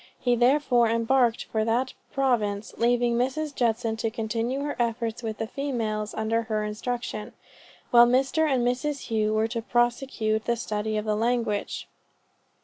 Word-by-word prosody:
He 245 -1 +2
therefore 245 -1 +3
embarked 230 +1 +2
for 220 -1 -1
that 240 +4 0 0.2
province, 220 -6 0
leaving 240 0 +2
Mrs. 285 +4 -1
Judson 225 -3 0
to 225 0 -1
continue 230 +3 -2
her 290 0 -3
efforts 230 0 -1
with 220 -2 -4
the 225 - -2
females 220 -5 -3
under 220 +1 0
her 215 -1 -2
instruction; 215 0 -4 0.6
while 240 0 +8
Mr. 270 +5 +2
and 250 -2 +2
Mrs. 260 +4 -2
Hough 215 -1 +1
were 220 +1 +2
to 230 0 -3
prosecute 240 -2 0
the 235 - +1
study 215 -2 -2
of 210 - -2
the 215 -1 +1
language. 230 -2 -1
235 Hz, 150 wpm, -26 LUFS, 220-250 Hz, 0.6 s, while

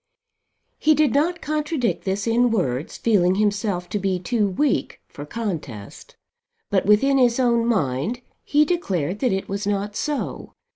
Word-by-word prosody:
He 310 0 +4
did 300 -1 +2
not 330 +5 +1
contradict 300 -4 -1
this 195 +1 -1
in 240 +2 +3
words, 145 - -2
feeling 190 -5 +2
himself 200 -3 0
to 205 - -2
be 190 -1 0
too 205 +4 0
weak 270 +9 -1
for 145 +1 -10
contest; 150 - -6 0.6
but 195 -1 +1
within 270 +7 +4
his 245 -1 +3
own 235 -2 +2
mind 170 - -1 0.2
he 295 +1 +3
declared 195 - -1
that 255 - +1
it 190 0 -2
was 200 +1 -3
not 205 0 -2
so. 295 +2 -3
210 Hz, 150 wpm, -22 LUFS, 190-255 Hz, 0.6 s, He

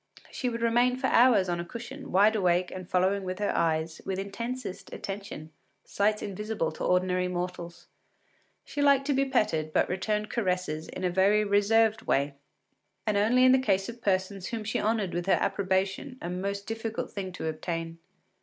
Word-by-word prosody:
She 250 - -2
would 230 -1 -4
remain 240 +2 +3
for 260 - -3
hours 235 -7 +5
on 175 -1 -1
a - - -2
cushion, 255 +8 -8
wide 205 +4 +5
awake 180 -3 +2
and 185 -1 -8
following 190 +2 +2
with 185 0 -4
her 205 0 -1
eyes, 160 -1 0
with 190 -1 -3
intensest 230 +2 -5
attention, 195 -6 -7 0.3
sights 210 +1 0
invisible 210 -3 -2
to 155 - -7
ordinary 180 0 +2
mortals. 175 -1 -5 0.8
She 290 - -4
liked 280 -1 +4
to 285 - +1
be 275 +1 +2
petted, 160 - 0
but - - +3
returned 210 +3 -2
caresses 180 -7 -1
in - - -7
a 180 - +1
very 200 +4 +4
reserved 215 +2 +3
way, 140 +1 0 0.7
and 215 -2 +1
only 225 +5 +4
in 255 - +7
the 260 - +5
case 195 -5 +1
of 235 0 -9
persons 190 -1 -1
whom 225 -2 -4
she 210 - -1
honoured 215 -4 0
with 175 +1 -3
her 185 -3 +4
approbation, 195 +7 -1
a 175 - -5
most 200 +2 -3
difficult 225 0 -4
thing 190 -2 -5
to - - -6
obtain. 165 +1 -4
200 Hz, 180 wpm, -28 LUFS, 180-225 Hz, 0.8 s, in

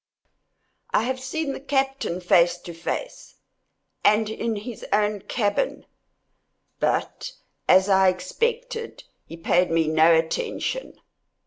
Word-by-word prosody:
I - - +2
have 260 +2 -2
seen 275 +3 -3
the - - -6
captain 270 -9 -1
face 175 0 +4
to 175 0 -10
face, - - -6 0.7
and 215 +1 +3
in 225 0 -2
his 215 +3 -7
own 210 0 +1
cabin—but, 220 - -2 1.8
as 190 +1 +6
I 190 -1 +5
expected, 460 - -3 0.2
he 165 - -9
paid 175 +2 +2
me 165 -1 +2
no 160 +1 +5
attention. 460 - -3
210 Hz, 110 wpm, -24 LUFS, 175-275 Hz, 1.8 s, as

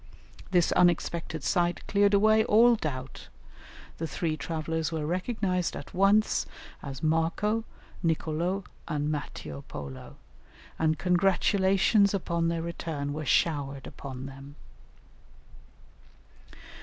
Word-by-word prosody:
This 175 -2 +3
unexpected 170 -3 +1
sight 175 -2 0
cleared 200 0 +3
away 215 +2 +5
all 235 +3 +6
doubt; 135 - -5 0.7
the 165 - -2
three 160 +1 -2
travellers 160 +1 -3
were 160 -2 -2
recognized 185 +1 -1
at - - -8
once 200 +3 +3 0.3
as 135 0 -7
Marco, 170 +8 +1 0.4
Nicolo, 165 +3 -1 0.2
and 150 -2 -1
Matteo 75 - -5
Polo, 70 -3 -8 0.6
and 155 -1 +2
congratulations 195 +2 +3
upon 170 -3 -1
their 165 -1 -1
return 160 -4 -4
were 155 +1 -4
showered 140 -4 +1
upon 130 -1 -8
them. 135 +1 -10
165 Hz, 105 wpm, -28 LUFS, 150-190 Hz, 0.7 s, all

